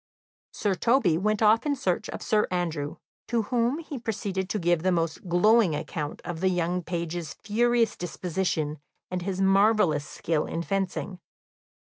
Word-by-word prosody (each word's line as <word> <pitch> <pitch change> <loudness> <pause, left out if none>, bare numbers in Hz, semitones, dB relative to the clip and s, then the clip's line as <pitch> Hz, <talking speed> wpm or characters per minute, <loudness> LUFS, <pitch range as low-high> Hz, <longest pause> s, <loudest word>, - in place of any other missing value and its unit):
Sir 205 -2 0
Toby 215 - +3
went 215 +2 +1
off 220 +1 +5
in 290 -2 0
search 215 -3 -1
of - - -6
Sir 210 -1 +2
Andrew, 165 -5 -2 0.3
to 230 -1 +1
whom 240 +5 +1
he 310 -5 -6
proceeded 200 -4 -3
to 215 - -1
give 175 -3 +2
the 185 +2 +2
most 165 +1 -1
glowing 190 0 +4
account 150 0 -5
of 175 -2 -4
the 190 +2 +2
young 180 0 0
page's 170 -2 -4
furious 235 +1 +1
disposition, 170 -3 -2 0.3
and 180 -1 -2
his 190 +1 -2
marvellous 195 -6 +3
skill 155 -2 -1
in 165 - -3
fencing. 195 -1 -2
185 Hz, 155 wpm, -27 LUFS, 170-215 Hz, 0.3 s, off